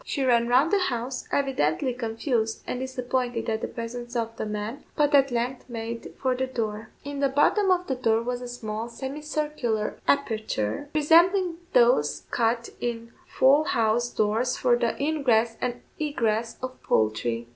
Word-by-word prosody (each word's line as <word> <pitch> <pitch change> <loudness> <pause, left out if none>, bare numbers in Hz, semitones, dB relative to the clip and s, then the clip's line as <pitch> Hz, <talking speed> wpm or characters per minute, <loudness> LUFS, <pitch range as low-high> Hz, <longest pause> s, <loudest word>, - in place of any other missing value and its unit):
She 280 - -2
ran 235 -2 +3
round 260 +6 +4
the 405 - +4
house, 250 -6 -2
evidently 260 - +1
confused 225 -1 -2
and 250 - -3
disappointed 250 -2 -2
at 220 0 -1
the - - -2
presence 240 +1 -6
of 230 -1 -2
the 220 - -4
men, 210 +6 -4
but 295 0 +2
at 275 -1 +6
length 245 +2 -3
made 230 0 -6
for 260 -1 +1
the 260 +1 -1
door. 220 -3 -4
In 285 0 -5
the 280 -1 +2
bottom 380 +9 +3
of 360 -1 +3
the 270 - -1
door 230 -3 +1
was 245 +1 -3
a 250 - -6
small, 225 -1 -5
semicircular 275 -4 -3
aperture, 220 - 0
resembling 340 +4 +4 0.2
those - - +4
cut 235 0 0
in 230 -1 -4 0.2
fowl 280 +3 +4
house 235 -2 +1
doors 225 +4 0
for 245 -2 +3
the 235 -1 -1
ingress 255 -7 +2
and 245 -1 -2 0.2
egress 230 -7 -1
of 255 0 -6
poultry. 115 +2 0
245 Hz, 160 wpm, -26 LUFS, 225-280 Hz, 0.2 s, at